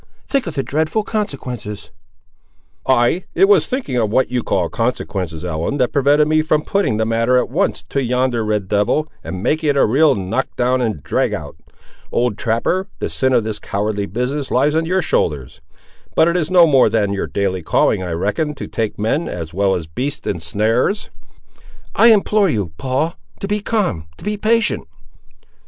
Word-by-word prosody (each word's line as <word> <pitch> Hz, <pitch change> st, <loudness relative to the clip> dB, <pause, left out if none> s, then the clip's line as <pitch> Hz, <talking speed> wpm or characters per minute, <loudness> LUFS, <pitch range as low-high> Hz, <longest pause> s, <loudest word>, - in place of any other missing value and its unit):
Think 275 Hz, -7 st, -1 dB
of 165 Hz, -, -5 dB
the 135 Hz, -, 0 dB
dreadful 155 Hz, -, 0 dB
consequences!" 125 Hz, -, -4 dB, 1.0 s
"Ay, 130 Hz, +7 st, +2 dB
it 195 Hz, -, +5 dB
was 195 Hz, -6 st, +4 dB
thinking 250 Hz, -, -2 dB
of 110 Hz, -3 st, +1 dB
what 130 Hz, +5 st, +1 dB
you 125 Hz, -1 st, 0 dB
call 90 Hz, -5 st, 0 dB
consequences, 95 Hz, -8 st, -3 dB
Ellen, 85 Hz, -, -2 dB
that 125 Hz, -3 st, +1 dB
prevented 145 Hz, +2 st, +4 dB
me 155 Hz, 0 st, +3 dB
from 155 Hz, -1 st, +1 dB
putting 195 Hz, -, 0 dB
the 110 Hz, -, +1 dB
matter, 115 Hz, +3 st, +2 dB
at 125 Hz, -, 0 dB
once, 185 Hz, +8 st, 0 dB
to 140 Hz, -, 0 dB
yonder 125 Hz, -1 st, 0 dB
red 105 Hz, -3 st, -1 dB
devil, 105 Hz, +10 st, +1 dB, 0.2 s
and 95 Hz, 0 st, -6 dB
making 155 Hz, 0 st, +1 dB
it 140 Hz, -, +2 dB
a -, -, +5 dB
real 140 Hz, +5 st, +4 dB
knock 105 Hz, +7 st, -2 dB
down 125 Hz, +1 st, +1 dB
and 110 Hz, -, -2 dB
drag -, -, 0 dB
out! -, -, -8 dB, 0.6 s
Old 120 Hz, -3 st, +1 dB
trapper, 140 Hz, -, 0 dB
the -, -, -4 dB
sin 130 Hz, 0 st, +1 dB
of 120 Hz, -3 st, +3 dB
this 110 Hz, -1 st, -4 dB
cowardly 100 Hz, 0 st, -2 dB
business 125 Hz, -, -3 dB
lies 140 Hz, +4 st, +2 dB
on 160 Hz, +1 st, 0 dB
your 185 Hz, +1 st, +1 dB
shoulders! 70 Hz, -6 st, -1 dB, 0.5 s
But 160 Hz, -, +5 dB
it 170 Hz, -, +1 dB
is 165 Hz, -3 st, 0 dB
no 180 Hz, -2 st, +7 dB
more 140 Hz, -5 st, +4 dB
than 105 Hz, -3 st, +1 dB
your 100 Hz, -, -2 dB
daily 95 Hz, -2 st, -1 dB
calling, 85 Hz, -, +2 dB
I 90 Hz, -2 st, -3 dB
reckon, 145 Hz, -, -1 dB
to -, -, -6 dB
take 110 Hz, -2 st, -3 dB
men, 140 Hz, +11 st, 0 dB
as 80 Hz, -2 st, -6 dB
well 95 Hz, +1 st, +2 dB
as 85 Hz, -, -4 dB
beasts, 140 Hz, -, -4 dB
in 85 Hz, -, -2 dB
snares." 110 Hz, -, 0 dB, 0.8 s
"I 230 Hz, -, +5 dB
implore 210 Hz, -2 st, +4 dB
you, 100 Hz, -, -1 dB
Paul, 135 Hz, +6 st, -1 dB, 0.3 s
to 195 Hz, -, -4 dB
be 210 Hz, +1 st, 0 dB
calm—to 135 Hz, -, -3 dB
be 210 Hz, 0 st, -1 dB
patient." 215 Hz, -, +1 dB
125 Hz, 185 wpm, -18 LUFS, 105-155 Hz, 1.0 s, no